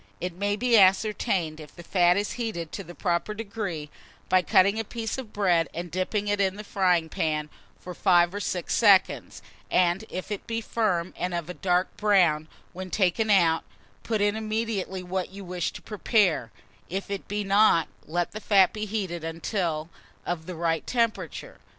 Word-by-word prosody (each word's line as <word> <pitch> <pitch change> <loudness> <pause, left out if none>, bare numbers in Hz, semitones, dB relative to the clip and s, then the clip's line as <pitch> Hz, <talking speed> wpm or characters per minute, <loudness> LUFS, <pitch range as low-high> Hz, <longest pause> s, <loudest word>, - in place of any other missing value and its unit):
It 180 -1 -3
may 200 +3 -1
be 235 0 +4
ascertained 190 -4 +2
if 150 -1 -12
the 175 - -10
fat 175 0 +3
is 205 0 -1
heated 220 -10 -4
to - - -5
the 175 +1 -11
proper 175 +4 -1
degree, 200 -8 -5 0.4
by 185 - +5
cutting 200 +4 +3
a - - 0
piece 225 +2 -4
of 235 -5 -8
bread 175 -7 +2
and 170 0 -5
dipping 200 +3 -1
it 205 0 +1
in 190 -1 +1
the 210 - -7
frying 180 -5 +1
pan 150 -1 -2 0.3
for 180 - -8
five 175 -1 +3
or 205 - -3
six 180 -4 -2
seconds; 200 -4 +3 0.3
and 180 +2 +2
if 185 +3 -6
it 205 - -5
be 230 0 -1
firm 205 -6 -1
and 180 0 -2
of 170 0 -4
a - - -6
dark 180 0 0
brown 175 -7 +3 0.3
when 185 +1 -7
taken 200 +3 +1
out, 170 -5 +4 0.4
put 220 -3 -1
in 205 +1 +2
immediately 215 -4 -2
what 180 0 -3
you 195 0 -10
wish 175 -1 -2
to - - -10
prepare; 200 - +1 0.4
if 195 +2 -4
it 200 - -4
be 205 +1 -2
not, 195 -4 +4 0.2
let 175 +2 -1
the 215 - -7
fat 195 -3 +4
be 215 0 -3
heated 190 -6 -3
until 165 -1 -2 0.4
of 165 -2 -3
the 180 - -5
right 165 0 -1
temperature. 235 - -2
185 Hz, 180 wpm, -26 LUFS, 175-210 Hz, 0.4 s, by